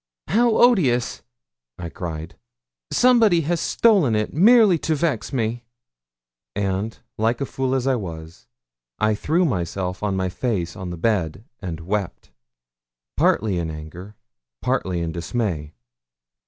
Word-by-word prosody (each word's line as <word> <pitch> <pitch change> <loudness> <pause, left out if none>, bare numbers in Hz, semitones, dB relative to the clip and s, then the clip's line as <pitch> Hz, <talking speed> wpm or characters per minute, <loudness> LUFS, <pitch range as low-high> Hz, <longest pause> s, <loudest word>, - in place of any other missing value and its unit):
'How 235 +1 +3
odious!' 155 - +3 0.6
I 85 -1 -6
cried; 80 -2 -6 0.6
'somebody 230 -9 +4
has 165 +2 -1
stolen 195 - +3
it 105 0 -1
merely 205 +1 +6
to 160 - 0
vex 145 -6 -1
me.' 120 -2 -2 0.9
And, 100 +2 -2 0.2
like 115 +2 +1
a 140 - -1
fool 130 0 -2
as 130 -1 -1
I 135 - +3
was, 85 -7 -7 0.5
I 110 0 +2
threw 160 - +1
myself 90 - -2
on 105 -2 -1
my 95 -1 0
face 90 -2 -2
on 95 -2 -6
the 85 - -6
bed 95 -1 -1 0.2
and 85 -4 -5
wept, 100 +2 -4 0.8
partly 100 -4 +2
in 85 -1 -3
anger, 80 +6 -9 0.4
partly 90 -1 -1
in 85 -1 -2
dismay. 85 -3 -3
105 Hz, 130 wpm, -22 LUFS, 90-140 Hz, 0.9 s, merely